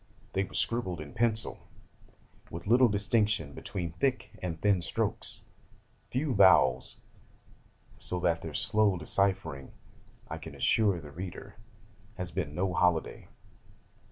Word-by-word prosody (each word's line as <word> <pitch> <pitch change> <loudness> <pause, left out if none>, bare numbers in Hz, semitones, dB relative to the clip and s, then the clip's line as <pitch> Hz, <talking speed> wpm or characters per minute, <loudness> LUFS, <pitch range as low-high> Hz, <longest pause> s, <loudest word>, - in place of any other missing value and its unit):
They 95 - +1
were - - -9
scribbled 95 -7 +1
in 75 -2 -8
pencil, 110 0 0 0.9
with 85 +1 -8
little 120 +4 +5
distinction 105 -6 0
between 85 -4 -5
thick 130 - -1
and 85 -3 -4
thin 100 -3 +2
strokes, - - +1 0.6
few 135 +2 -1
vowels: 80 - +4 1.0
so 90 - -1
that 85 -1 +1
their 80 -2 -7
slow 110 -4 +2
deciphering, 85 -5 -1 0.5
I - - -6
can - - -10
assure 100 -5 +2
the 75 -2 -11
reader, 95 +5 -8 0.6
has 90 -3 -5
been 80 -6 -3
no 90 +1 0
holiday. 90 -2 0
95 Hz, 125 wpm, -30 LUFS, 85-105 Hz, 1.0 s, little